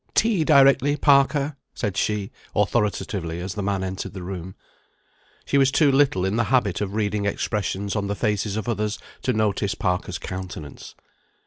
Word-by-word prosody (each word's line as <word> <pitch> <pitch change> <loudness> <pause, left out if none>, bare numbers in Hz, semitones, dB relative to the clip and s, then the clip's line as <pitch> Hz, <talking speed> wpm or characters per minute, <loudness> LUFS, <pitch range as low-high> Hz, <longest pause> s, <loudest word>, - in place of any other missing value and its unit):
"Tea 215 -7 +3
directly, 140 -1 +5
Parker," 140 0 +3 0.2
said 100 -2 -2
she, 100 0 -1 0.2
authoritatively, 100 -5 0
as 90 +1 -4
the 105 - -4
man 100 -1 -1
entered 95 0 -5
the 95 -2 -7
room. 95 0 -6 0.9
She 140 - +2
was 135 0 +4
too 145 0 +4
little 135 -10 +3
in 95 +3 0
the 120 - +2
habit 120 -9 +1
of 100 0 -3
reading 105 -1 0
expressions 100 -1 -2
on 100 -1 -1
the 100 - -2
faces 105 -1 -1
of 110 - -4
others 105 -2 -1 0.2
to 130 - 0
notice 105 -3 0
Parker's 90 -4 -1
countenance. 90 -5 -8
105 Hz, 160 wpm, -24 LUFS, 95-130 Hz, 0.9 s, directly